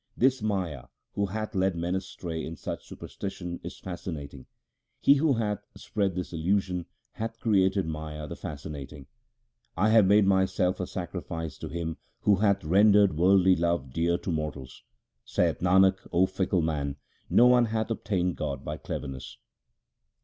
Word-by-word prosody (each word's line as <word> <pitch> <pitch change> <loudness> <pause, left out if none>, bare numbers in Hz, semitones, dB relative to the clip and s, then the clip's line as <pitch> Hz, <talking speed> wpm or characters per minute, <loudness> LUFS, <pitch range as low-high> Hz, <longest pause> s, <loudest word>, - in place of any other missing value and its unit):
This 130 0 +3
Maya 90 - -2 0.3
who 100 0 0
hath 110 +3 -4
led 95 -2 +1
man 85 +1 -2
astray 90 -3 -4
in 80 - -5
such - - -6
superstition 90 -3 -6
is 90 +2 -7
fascinating; 80 -7 -7 0.5
He 140 - +6
who 145 +1 +3
hath 105 -4 -1 0.2
spread 100 -4 -1
this 90 -1 -4
illusion 90 +1 0 0.2
hath 115 +1 -5
created 95 -3 +2
Maya 75 -1 -5
the - - -6
fascinating. 70 -2 -7 0.7
1 105 +5 +3
have 110 -4 +6
made 100 +1 +5
myself 95 -1 +2
a 90 - -2
sacrifice 85 -4 -5
to 80 - -6
Him 80 0 -4 0.2
who 100 -2 +4
hath 100 -1 +2
rendered 100 +2 +5
worldly 95 +2 +5
love 85 -6 -1
dear 85 +1 +1
to 90 - -4
mortals. 75 -5 -4 0.4
Saith - - 0
Nanak, 95 +2 +5
O 90 +2 +4
fickle 95 -2 0
man, 70 -3 -1 0.3
no 120 - +6
one 125 -1 +6
hath 110 0 -2
obtained 90 -5 -1
God 70 - -4
by - - -4
cleverness. 65 -1 -6
90 Hz, 150 wpm, -28 LUFS, 80-100 Hz, 0.7 s, He